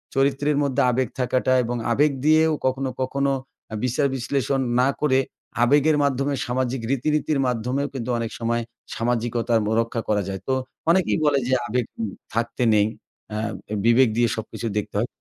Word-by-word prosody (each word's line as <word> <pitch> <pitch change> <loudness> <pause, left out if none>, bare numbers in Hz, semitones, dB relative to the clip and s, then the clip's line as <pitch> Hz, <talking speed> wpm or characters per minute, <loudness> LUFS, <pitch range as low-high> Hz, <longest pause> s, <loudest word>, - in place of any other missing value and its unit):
চরিত্রের 140 +2 +2
মধ্যে 135 -3 +1
আবেগ 130 0 0
থাকাটা 125 +1 +1
এবং 120 +1 -2 0.2
আবেগ 145 +4 +3
দিয়েও 155 0 +5
কখনো, 130 0 0
কখনো 140 +1 0 0.4
আ - - -2
বিচার-বিশ্লেষণ 135 0 0 0.2
না 130 - +4
করে 135 -3 +3 0.4
আবেগের 145 +4 +4
মাধ্যমে 140 +1 0
সামাজিক 125 0 -1
রীতিনীতির 150 +2 +1
মাধ্যমেও 125 +4 -1
কিন্তু 125 -2 -4
অনেক 115 -1 -3
সময় 115 0 0 0.3
সামাজিকতা 120 0 -1
ব - - -2
রক্ষা 115 0 -3
করা 105 -1 +2
যায়। 95 -1 -5
তো 130 - +1 0.4
অনেকেই 185 +1 +3
বলে 140 -2 +3
যে 130 - +1
আবেগ 120 +1 0 0.2
উ - - 0 0.3
থাকতে 115 +2 -1
নেই। 105 0 +4 0.5
আ - - -2 0.3
এ - - -1
বিবেক 120 +1 +5
দিয়ে 120 0 +4
সবকিছু 115 +1 -5
দেখতে 105 - -3
হয়। 120 - 0
130 Hz, 160 wpm, -23 LUFS, 115-140 Hz, 0.5 s, দিয়েও